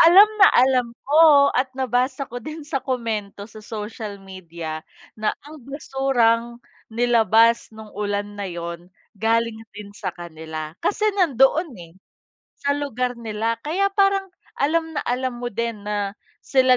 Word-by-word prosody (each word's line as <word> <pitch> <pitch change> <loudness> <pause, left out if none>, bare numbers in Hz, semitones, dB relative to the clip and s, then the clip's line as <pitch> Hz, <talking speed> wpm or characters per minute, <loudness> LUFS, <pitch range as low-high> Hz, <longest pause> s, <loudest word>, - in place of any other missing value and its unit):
alam 380 +6 +9
na 390 - +10
alam 255 -1 +4 0.2
ko 290 -1 +6
at 260 +1 +1
nabasa 260 +2 0
ko 245 +1 -6
din 310 +4 -8
sa 285 -3 -2
komento 225 -6 -3
sa 215 0 -12
social 210 -1 -6
media 170 -4 -7 0.4
na 215 - 0
ang 300 0 -11
basurang 240 -4 0 0.2
nilabas 230 -1 +3
no'ng 220 -1 -12
ulan 205 -1 -2 0.2
na 195 - -3
'yon, 170 0 -6 0.2
galing 225 +2 0 0.2
din 205 -1 -9
sa - - -5
kanila. 160 -2 -7
Kasi 420 - 0
nandoon, 320 - +3
eh, 170 -2 -12 0.7
sa 285 0 +1
lugar 250 -3 -2
nila, 225 0 -2
kaya 370 +7 +1
parang, 390 -1 +2 0.3
alam 320 +3 +1
na - - -2
alam 250 0 -1
mo 245 - -2
din 230 -1 -3
na, 205 -1 -2 0.3
sila 255 -2 +4
235 Hz, 145 wpm, -22 LUFS, 210-275 Hz, 0.7 s, na